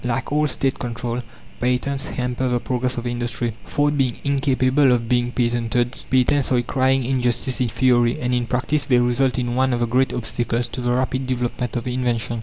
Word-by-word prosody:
Like 125 +2 -2
all 150 +1 +2
State 135 -2 -1
control, 120 0 -3 0.4
patents 125 +3 0
hamper 125 +1 -2
the 120 0 +1
progress 125 +1 -2
of 120 - -4
industry. 120 -1 -2
Thought 145 -1 +1
being 130 -3 +1
incapable 135 -1 +2
of 120 -2 +1
being 120 0 +1
patented, 120 0 -1
patents 130 +1 +2
are 125 - +4
a 120 - +1
crying 130 +1 +1
injustice 125 0 0
in 125 - +2
theory, 120 0 +2
and 125 0 -1
in 120 -1 0
practice 135 +4 0
they 130 -3 +3
result 125 +1 +2
in 120 -1 -1
one 130 +1 +2
of 120 - 0
the 120 - +2
great 130 +3 +1
obstacles 120 0 -2
to 125 - -5
the 120 0 0
rapid 130 +1 0
development 125 -1 -2
of 120 0 -3
invention. 120 -3 -1
125 Hz, 195 wpm, -22 LUFS, 120-130 Hz, 0.4 s, are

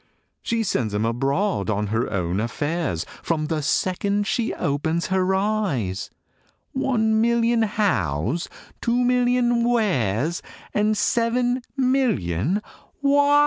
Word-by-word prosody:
She 230 -1 0
sends 120 - -1
'em 105 +2 +1
abroad 135 - 0
on 105 0 0
her 115 +2 0
own 90 -1 -1
affairs, 135 - -2 0.2
From 155 -2 -1
the 155 0 -1
second 200 +6 0
she 230 +2 0
opens 160 +4 -1
her 190 0 +2
eyes 190 - -1 0.6
One 220 -5 +1
million 235 0 +2
Hows, 170 - 0 0.3
two 235 +1 +1
million 245 -1 +2
Wheres, 170 - +1 0.3
And 210 +1 +2
seven 245 +3 +1 0.2
million 210 - +1 0.4
Whys! 285 +1 +5
195 Hz, 110 wpm, -23 LUFS, -, 0.6 s, Whys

